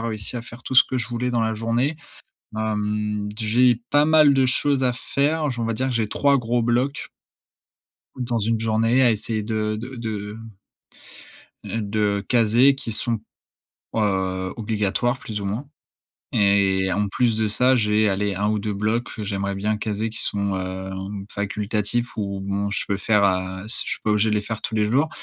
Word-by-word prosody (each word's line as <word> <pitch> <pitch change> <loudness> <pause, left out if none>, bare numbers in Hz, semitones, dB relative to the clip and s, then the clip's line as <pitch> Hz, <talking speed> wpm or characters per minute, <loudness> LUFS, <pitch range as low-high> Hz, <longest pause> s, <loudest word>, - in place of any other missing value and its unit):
réussi 110 0 -3
à 120 - -4
faire 120 +1 -12
tout 130 - -5
ce 125 - +8
que 130 - -3
je 120 -3 -1
voulais 125 +1 -2
dans 120 -1 +1
la 110 0 0
journée. 115 +7 0 0.6
Hem, 105 -1 -1
j'ai 120 +3 +3 0.2
pas 145 +1 +5
mal 155 -2 +6
de 135 -1 +3
choses 135 +1 +1
à 125 -1 +2
faire, 150 +4 0
j 120 - -6
on 115 - -1
va 115 - -1
dire 130 +4 -1
que - - -2
j'ai 115 -2 +1
3 140 +5 +3
gros 120 0 0
blocs 125 +4 0 1.1
dans 120 -2 -1
une 110 +1 0
journée 115 +3 +2
à 120 - +5
essayer 110 0 -2
de 110 0 -1
de 130 +3 -7
de 105 -2 -5 1.3
heu, 115 - -3
de 105 -1 0
caser 120 +3 +4
qui 135 -4 -6
sont, 115 +1 0 0.8
heu, 95 -3 0
obligatoires 110 +3 0
plus 105 -4 -5
ou 100 - -5
moins 110 +8 -3 0.7
et 100 -2 +3
en 105 +2 0
plus 115 +2 +1
de 110 -1 +1
ça, 125 +5 +3
j'ai, 105 -2 +2
allez 100 0 -1
1 105 +2 0
ou 105 -1 0
2 105 +1 -2
blocs 110 +4 -1
que 110 - -4
j'aimerais 100 -1 -2
bien 105 +2 0
caser 110 +1 -2
qui 110 - -5
sont, 100 -1 -1
heu, 95 0 -4 0.4
facultatifs 105 +3 -2
ou 100 -2 -3
bon, 100 +1 -2
je 105 - -1
peux 100 - -1
faire, 105 0 +3
heu, 95 0 -1
si 110 - +4
je - - -5
suis - - -14
pas 110 - +1
obligé 105 +1 +2
de 105 - +2
les - - +1
faire 110 +1 -5
tous 110 - -3
les 105 - +3
jours, 140 +8 +2
110 Hz, 195 wpm, -23 LUFS, 105-120 Hz, 1.3 s, ce